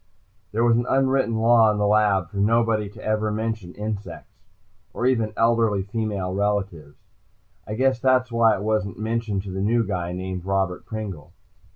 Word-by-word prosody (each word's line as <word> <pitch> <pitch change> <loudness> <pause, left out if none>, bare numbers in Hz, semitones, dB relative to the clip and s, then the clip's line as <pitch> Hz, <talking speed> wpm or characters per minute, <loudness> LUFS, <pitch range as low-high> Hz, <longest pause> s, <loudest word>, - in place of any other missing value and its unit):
There 115 +2 0
was 115 -1 +4
an 120 +1 -1
unwritten 135 -3 +2
law 115 0 +5
in 105 - -2
the 105 - +1
lab 100 -4 +2
for 100 - -7
nobody 110 0 +2
ever 110 0 -1
to 105 - -2
mention 110 -5 -4
insects, 105 -1 -6 0.6
or 120 - -2
even 115 -4 +1
elderly 115 -4 +2
female 100 -3 -3
relatives. 95 -7 -2 0.7
I 105 - -4
guess 130 +1 +1
that 130 0 +4
was 130 -1 -19
why 115 -1 +4
it 100 - -6
wasn't 105 -3 -1
mentioned 110 -2 -2
to 100 - -7
the 95 +1 -4
new 115 +3 +2
guy, 90 -3 -3
name 95 +1 -4
of 90 - -13
Robert 95 -2 -1
Pringle. 95 -7 -7
105 Hz, 180 wpm, -23 LUFS, 95-115 Hz, 0.7 s, law